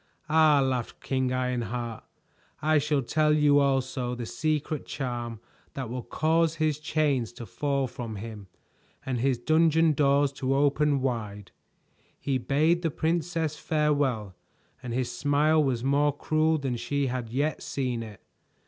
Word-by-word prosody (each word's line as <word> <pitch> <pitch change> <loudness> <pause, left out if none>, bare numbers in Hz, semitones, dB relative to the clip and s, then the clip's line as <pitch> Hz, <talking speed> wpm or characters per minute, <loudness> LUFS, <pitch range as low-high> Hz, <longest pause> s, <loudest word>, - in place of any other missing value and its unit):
"Ah," 155 -2 +5
laughed 130 -3 -2
King 130 -1 -1
Ironheart, 120 -2 -2 0.6
"I 155 0 +3
shall 145 -1 0
tell 150 +4 +2
you 145 -1 +4
also 130 -3 0
the 120 -1 -5
secret 155 +2 -2
charm 120 -4 -4 0.4
that 130 -4 -4
will 125 0 -3
cause 160 +5 +1
his 155 -2 0
chains 150 -6 0
to 120 - -8
fall 140 +5 -1
from 115 -3 -6
him 105 -1 -8 0.6
and 130 -2 -2
his 130 +1 +1
dungeon 160 +4 +3
doors 140 0 +3
to 135 -1 -1
open 145 0 +2
wide." 105 -6 -3 0.7
He 135 -2 -1
bade 155 +7 +2
the 165 - 0
princess 160 0 -1
farewell, 145 - 0 0.5
and 125 -2 -6
his 125 +1 -1
smile 150 +2 +3
was 125 -4 -1
more 145 +1 +2
cruel 155 +1 +1
than 135 -4 -2
she 140 +4 -1
had 125 -3 -3
yet 145 +6 -1
seen 125 -4 -2
it. 110 -3 -10
140 Hz, 145 wpm, -27 LUFS, 125-150 Hz, 0.7 s, Ah